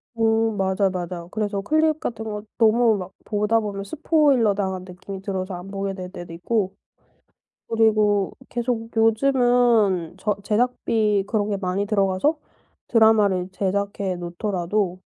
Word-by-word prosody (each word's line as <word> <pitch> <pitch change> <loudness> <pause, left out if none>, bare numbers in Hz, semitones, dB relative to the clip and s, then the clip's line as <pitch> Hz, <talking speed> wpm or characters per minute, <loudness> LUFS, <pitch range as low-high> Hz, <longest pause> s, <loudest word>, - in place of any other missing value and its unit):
음. 225 -1 +1
맞아요, 190 0 +1
맞아요. 175 -1 -5
그래서 205 -2 -2
클립 310 +7 +2
같은 225 -5 -4
거 210 -1 -4 0.2
너무 225 -1 +4
막 185 0 -7
보다 210 +1 +1
보면 200 -2 -4
스포일러 280 -2 +2
당한 190 -2 -2
느낌이 190 +1 -8
들어서 190 -1 -4
안 180 +2 -8
보게 195 0 -3
될 185 -1 -7
때도 175 -3 -9
있고 190 +3 -1 1.0
그리고 215 -3 +3 0.2
계속 235 -2 -2
요즘은 225 -6 +3
저 205 +1 -1
제작비 215 -2 +1
그런 210 -1 0
게 200 - -1
많이 190 +1 -1
들어가서 200 +8 +1 0.5
드라마를 210 -5 +3
제작해 200 0 -2
놓더라도 180 +1 -2
205 Hz, 295 characters per minute, -23 LUFS, 190-225 Hz, 1.0 s, 너무